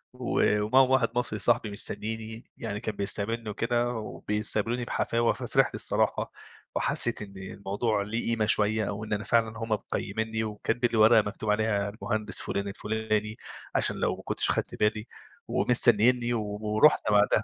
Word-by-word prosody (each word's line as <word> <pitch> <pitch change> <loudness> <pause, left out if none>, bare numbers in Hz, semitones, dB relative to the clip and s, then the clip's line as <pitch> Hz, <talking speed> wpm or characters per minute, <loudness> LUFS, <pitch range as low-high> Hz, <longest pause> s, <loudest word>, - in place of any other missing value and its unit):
و - - -1 0.2
ومعاهم 130 +5 +4
واحد 130 -3 +3
مصري 120 -3 0
صحبي 105 +1 +2
مستنيني. 110 +2 -5
يعني 105 -3 -4
كان 110 -1 -4
بيستقبلني 105 +3 -2
وكده 120 +3 0
وبيستقبلوني 110 +1 -2
بحفاوة، 115 -1 0
ففرحت - - 0
الصراحة - - 0 0.4
وحسّيت 120 -2 +1
إن 100 -2 -9
الموضوع 100 +3 -2
ليه 115 +3 -3
قيمة 110 -2 +1
شوية، 105 0 +2
وإن 105 +1 -4
أنا 105 0 -2
فعلًا 115 -1 +1
هُم 115 0 -5
مقيمينني 110 +1 -2
وكاتبين 115 +3 -1
لي - - +1
ورقة 110 +1 +7
مكتوب 105 +1 -5
عليها 105 -1 0
المهندس 110 +1 -1
فُلان 100 0 -3
الفُلاني 110 +1 -2 0.4
عشان - - +1
لو - - 0
ما - - -12
كنتش - - +3
خدت - - -2
بالي 105 0 0 0.4
ومستنينّي 120 0 +3
و 115 -2 -1 0.2
ورُحنا 110 +3 +3
بعدها. 105 +1 +3
110 Hz, 150 wpm, -27 LUFS, 105-115 Hz, 0.4 s, ورقة